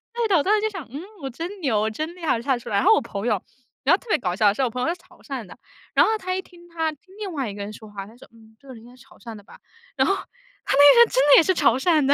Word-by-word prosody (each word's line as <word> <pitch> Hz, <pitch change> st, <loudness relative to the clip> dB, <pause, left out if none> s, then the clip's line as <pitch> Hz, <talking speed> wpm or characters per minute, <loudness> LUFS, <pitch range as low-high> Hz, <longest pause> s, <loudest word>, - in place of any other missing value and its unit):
对 475 Hz, -1 st, 0 dB
的， 400 Hz, -, +2 dB
我 290 Hz, -, +1 dB
当 405 Hz, -, +2 dB
时 425 Hz, -, 0 dB
就 435 Hz, -, 0 dB
想， 380 Hz, -, -8 dB
嗯， 285 Hz, +4 st, -6 dB, 0.2 s
我 270 Hz, -, -4 dB
真 345 Hz, +10 st, -7 dB
牛， 250 Hz, -9 st, +1 dB
我 215 Hz, -, 0 dB
真 310 Hz, +10 st, -5 dB
厉 355 Hz, -2 st, -8 dB
害 275 Hz, -, +2 dB
就 -, -, -9 dB
看 265 Hz, -1 st, +1 dB
出 -, -, -10 dB
来。 200 Hz, -, 0 dB
然 -, -, +2 dB
后 435 Hz, -, +7 dB
我 440 Hz, -, +3 dB
朋 205 Hz, -4 st, -6 dB
友 210 Hz, -5 st, 0 dB, 0.4 s
然 -, -, +4 dB
后 -, -, +5 dB
特 -, -, -22 dB
别 -, -, +3 dB
搞 180 Hz, -6 st, -3 dB
笑 205 Hz, 0 st, +3 dB
是 240 Hz, -, -3 dB
我 255 Hz, -, +1 dB
朋 250 Hz, +2 st, -5 dB
友 -, -, 0 dB
是 -, -, -10 dB
潮 360 Hz, 0 st, -22 dB
汕 265 Hz, -6 st, -6 dB
的， 185 Hz, -, -14 dB, 0.4 s
然 -, -, +5 dB
后 440 Hz, -, +1 dB
他 370 Hz, -2 st, -3 dB
一 375 Hz, -, -2 dB
听 345 Hz, -2 st, -18 dB
他， 325 Hz, -2 st, -2 dB
听 355 Hz, +6 st, -19 dB
另 415 Hz, -3 st, -5 dB
外 270 Hz, -7 st, -3 dB
一 -, -, -7 dB
个 205 Hz, -, -6 dB
人 205 Hz, -, -7 dB
说 215 Hz, 0 st, -12 dB
话， 200 Hz, -1 st, -7 dB
他 220 Hz, +3 st, -16 dB
说： -, -, -16 dB
“嗯， 220 Hz, -1 st, -20 dB
这 275 Hz, -, -21 dB
个 260 Hz, -, -9 dB
人 225 Hz, -2 st, -13 dB
应 240 Hz, -, -15 dB
该 250 Hz, -, -17 dB
潮 255 Hz, -, -20 dB
汕 230 Hz, -2 st, -10 dB
的 205 Hz, -, -13 dB
吧。” -, -, -17 dB, 0.4 s
然 -, -, +2 dB
后 390 Hz, -, +3 dB, 0.5 s
他 -, -, +1 dB
那 285 Hz, +1 st, +8 dB
个 -, -, +6 dB
人 470 Hz, -, +8 dB
真 -, -, -13 dB, 0.2 s
的 -, -, +9 dB
也 -, -, +7 dB
是 375 Hz, -, +2 dB
潮 280 Hz, -8 st, +3 dB
汕 310 Hz, 0 st, +2 dB
的。 280 Hz, -, +4 dB
275 Hz, 380 characters per minute, -23 LUFS, 225-355 Hz, 0.5 s, 的